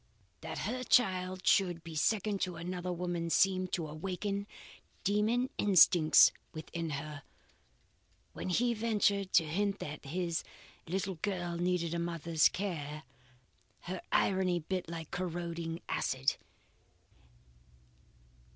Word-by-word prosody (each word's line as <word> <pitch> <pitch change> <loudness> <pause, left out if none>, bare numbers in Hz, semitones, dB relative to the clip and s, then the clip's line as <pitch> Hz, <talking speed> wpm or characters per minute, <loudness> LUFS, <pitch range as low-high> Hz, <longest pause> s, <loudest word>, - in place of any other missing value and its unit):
That - - -6
her 250 +5 -3
child 185 -6 +2
should 175 -4 +3
be 165 - -8
second 200 +5 0
to 180 -2 -1
another 180 +1 -4
woman's 175 -1 -1
seemed 185 -1 +2
to 165 -3 -1
awaken 195 +6 -3 0.6
demon 220 +5 +1
instincts 175 -5 +7 0.2
within 165 +1 -5
her. 145 0 -5 1.1
When - - -5
he 235 +6 +2
ventured 210 -3 +1
to 165 - +6
hint 200 +5 -1
that 150 0 -7
his 170 +2 -2 0.4
little 190 0 -2
girl 175 -4 -2
needed 175 -1 0
a 170 - -1
mother's 170 -2 +2
care, 155 -6 -4 0.8
her 180 +1 -5
irony 185 -2 +2
bit 180 +1 -4
like 165 -2 -6
corroding 170 -2 -4
acid. 130 +2 0
180 Hz, 115 wpm, -32 LUFS, 165-195 Hz, 1.1 s, instincts